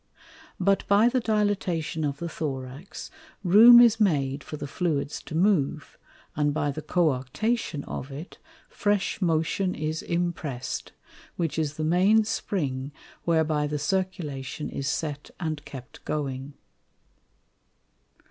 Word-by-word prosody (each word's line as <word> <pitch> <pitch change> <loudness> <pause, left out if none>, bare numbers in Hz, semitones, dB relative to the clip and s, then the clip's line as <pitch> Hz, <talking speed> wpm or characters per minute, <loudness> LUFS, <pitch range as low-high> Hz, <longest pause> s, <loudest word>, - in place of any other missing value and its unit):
But 195 +1 +2
by 205 +3 +5
the 255 - +1
Dilatation 200 -8 0
of 140 -1 -1
the 170 - -4
Thorax, 140 0 -6 0.3
room 225 +6 +9
is 230 -2 +6
made 140 -8 +1
for 150 - -7
the 145 - -5
Fluids 145 -2 -2
to 155 - -8
move, 175 -5 +1 0.4
and 145 0 +1
by 145 -2 0
the 155 +3 -6
Coarctation 155 - 0
of 130 - -5
it, 145 +6 -9 0.3
fresh 205 0 0
motion 170 +2 +1
is 155 +1 -2
imprest, 170 -7 -3 0.4
which 165 -2 -1
is 155 -1 -1
the 155 - -3
main 185 +7 +4
Spring 140 -10 -2 0.3
whereby 155 -3 +2
the 150 0 -2
Circulation 150 -5 -2
is 135 - -3
set 145 -1 -3
and 155 -4 -3
kept 130 -1 -10
going. 140 -2 -4
155 Hz, 125 wpm, -26 LUFS, 145-190 Hz, 0.4 s, room